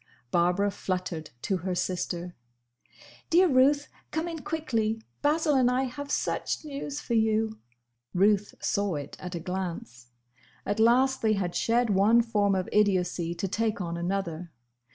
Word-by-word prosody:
Barbara 180 +4 +2
fluttered 180 -5 -4
to 190 - 0
her 180 +1 -3
sister. 180 -1 -2 1.0
"Dear 360 +3 +5
Ruth! 285 +1 +4 0.2
Come 320 +2 -2
in 330 -1 -5
quickly! 230 -9 -1 0.2
Basil 300 +1 +2
and 255 -3 +4
I 255 +1 +1
have 285 +2 -5
such 310 - -1
news 285 0 -5
for 235 - -4
you!" 220 -1 +1 0.6
Ruth 205 +2 +3
saw 200 -4 0
it 145 -2 -6
at 180 -1 -6
a - - -3
glance. 165 -10 -5 0.6
At 205 +2 -1
last 255 +4 +4
they 220 -1 +3
had 185 -4 -1
shed 235 0 +2
one 210 +5 +5
form 205 -4 +1
of 185 0 -1
idiocy 180 -4 +1
to 195 - -2
take 220 +3 -1
on 170 -3 -3
another. 175 -1 -3
205 Hz, 150 wpm, -28 LUFS, 180-250 Hz, 1.0 s, Dear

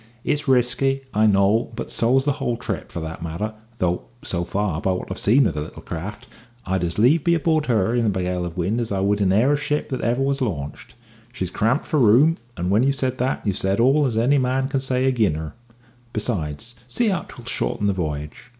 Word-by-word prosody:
It's 150 0 -1
risky, 130 +1 +2
I 110 +1 +4
know; 100 +3 +3
but - - -5
so's 130 +4 +2
the 145 - +3
whole 120 -1 0
trip, 125 - -4
for 85 - -5
that 80 0 -6
matter, 85 +7 -4 0.2
though, 90 -3 -1 0.2
so 85 -1 -1
far, 95 -3 -2
by 95 - +1
what 90 - -5
I've 95 - -4
seen 125 +6 +4
of - - +1
the 75 - -3
little 75 - -9
craft, 105 +9 -6 0.4
I'd 95 -1 -1
as 85 -1 -2
lieve 135 +8 +4
be 170 0 +3
aboard 160 -2 +1
her 115 -3 +2
in 120 -2 +1
a - - +4
gale 90 -2 -1
of 85 0 -6
wind 100 +7 0
as 115 - -4
I 100 - 0
would 100 +2 +1
be 100 - +2
in 95 - +3
e'er 120 +9 +4
a - - +4
ship 150 0 -2
that 130 - -3
ever 120 +3 +1
was 140 0 0
launched. 75 - -4 0.4
She's 95 -8 -4
cramped 115 - +1
for 155 - 0
room, 130 +8 +5 0.2
and 90 +2 -1
when 105 +3 +4
you've 135 +2 +2
said 130 -2 -2
that 130 0 -1
you've 100 -2 0
said 95 +2 0
all 135 +4 +4
as 115 -3 -2
any 135 +5 +3
man 130 +1 0
can 135 - 0
say 130 -1 0
ag'in 115 -11 +2
her. 80 0 -6 0.6
Besides, 105 -2 -2
see 220 - +1
how 190 -3 +1
'twill 120 -5 -12
shorten 115 -3 -1
the 100 - +2
v'yage. 75 +3 -5
115 Hz, 230 wpm, -22 LUFS, 95-130 Hz, 0.6 s, room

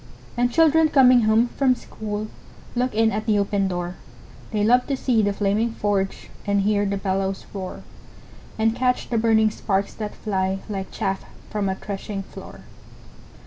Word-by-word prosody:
And 245 0 +1
children 320 +1 +5
coming 255 -5 +6
home 220 +3 +3
from 260 -1 +2
school 215 -2 -5 0.5
Look 250 -1 0
in 225 0 +3
at 215 +1 -3
the 215 -2 +3
open 200 -1 +1
door; 175 0 -4 0.5
They 210 -2 0
love 245 +3 +4
to 275 - -1
see 245 -4 +2
the 205 -1 +1
flaming 210 +3 0
forge, 200 -3 -2 0.2
And 200 0 +2
hear 205 0 +2
the 200 0 -1
bellows 195 0 -2
roar, 190 -2 -6 0.7
And 225 +1 +2
catch 250 0 0
the 230 - +2
burning 220 -1 +3
sparks 200 -2 -1
that 210 -1 -6
fly, 190 -2 -1
Like 195 -3 -4
chaff 195 0 -2 0.3
from 205 -2 -1
a 190 - -1
threshing 195 0 -5
floor. - - -11
210 Hz, 165 wpm, -23 LUFS, 195-235 Hz, 0.7 s, coming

